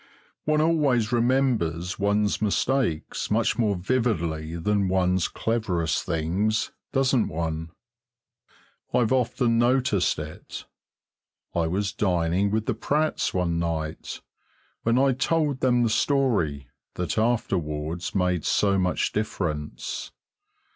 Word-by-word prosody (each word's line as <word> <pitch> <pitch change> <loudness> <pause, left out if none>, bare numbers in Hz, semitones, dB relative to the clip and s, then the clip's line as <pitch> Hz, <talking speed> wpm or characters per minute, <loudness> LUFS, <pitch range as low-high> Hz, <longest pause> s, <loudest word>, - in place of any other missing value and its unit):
One 155 0 +2
always 145 -9 +2
remembers 115 - +1
one's 105 +1 +1
mistakes 110 - 0
much 110 +2 +1
more 105 -4 +2
vividly 85 -7 -1
than 100 +3 +1
one's 90 -1 +2
cleverest 95 -9 -1
things, 95 +7 0 0.2
doesn't 135 -3 +2
one? 80 0 -3 1.3
I've 120 -2 +2
often 125 -2 +2
noticed 120 - +2
it. 75 0 -8 0.9
I 85 -1 +1
was 100 +4 -1
dining 90 0 +1
with 110 +1 -1
the - - 0
Pratts 155 +2 0
one 85 -2 0
night, 80 -2 -3 0.6
when 115 +1 +2
I 135 +1 +4
told 145 +1 0
them 125 -2 +3
the 115 - +2
story 105 - +1 0.3
that 90 +4 -1
afterwards 85 -9 -1
made 90 -3 +1
so 100 -1 +2
much 90 -1 0
difference. 85 -9 -3
100 Hz, 110 wpm, -25 LUFS, 85-120 Hz, 1.3 s, I